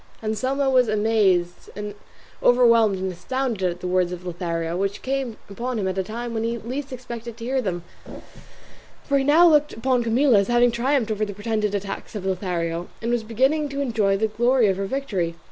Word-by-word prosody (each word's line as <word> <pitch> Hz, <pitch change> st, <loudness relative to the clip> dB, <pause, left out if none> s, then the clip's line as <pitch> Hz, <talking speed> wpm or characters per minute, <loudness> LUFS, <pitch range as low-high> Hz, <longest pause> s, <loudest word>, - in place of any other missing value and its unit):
Anselmo 260 Hz, +6 st, 0 dB
was 255 Hz, -2 st, +4 dB
amazed, 210 Hz, -5 st, +1 dB, 0.7 s
overwhelmed, 230 Hz, -4 st, +5 dB
and 190 Hz, 0 st, -2 dB
astounded 220 Hz, +1 st, -2 dB
at 175 Hz, 0 st, -6 dB
the 180 Hz, -, -3 dB
words 180 Hz, -1 st, +1 dB
of 180 Hz, 0 st, -7 dB
Lothario, 170 Hz, -1 st, -3 dB
which 195 Hz, +2 st, -2 dB
came 265 Hz, -4 st, -2 dB
upon 240 Hz, +5 st, -4 dB
him 195 Hz, -3 st, -1 dB
at 190 Hz, 0 st, -2 dB
a -, -, +1 dB
time 235 Hz, +4 st, -5 dB
when 225 Hz, -1 st, -1 dB
he 230 Hz, +1 st, -1 dB
least 265 Hz, +5 st, -5 dB
expected 235 Hz, -2 st, -7 dB
to 230 Hz, -, -7 dB
hear 260 Hz, +1 st, 0 dB
them, 175 Hz, -6 st, -3 dB, 1.2 s
for 280 Hz, -1 st, +1 dB
he -, -, 0 dB
now 315 Hz, +5 st, +6 dB
looked 300 Hz, -2 st, +4 dB
upon 250 Hz, +2 st, +1 dB
Camilla 235 Hz, 0 st, +4 dB
as 200 Hz, -, 0 dB
having 240 Hz, 0 st, +4 dB
triumphed 240 Hz, -1 st, 0 dB
over 215 Hz, 0 st, -1 dB
the 205 Hz, -2 st, -4 dB
pretended 210 Hz, 0 st, -1 dB
attacks 200 Hz, +3 st, -5 dB
of 195 Hz, -3 st, -5 dB
Lothario, 175 Hz, -3 st, -2 dB
and 230 Hz, +1 st, -2 dB
was 240 Hz, -1 st, +1 dB
beginning 265 Hz, +7 st, +1 dB
to 275 Hz, 0 st, -5 dB
enjoy 220 Hz, -7 st, +1 dB
the 220 Hz, -, +1 dB
glory 240 Hz, +3 st, +2 dB
of 190 Hz, -, 0 dB
her 195 Hz, 0 st, -2 dB
victory. 195 Hz, -11 st, -2 dB
225 Hz, 195 wpm, -23 LUFS, 190-255 Hz, 1.2 s, now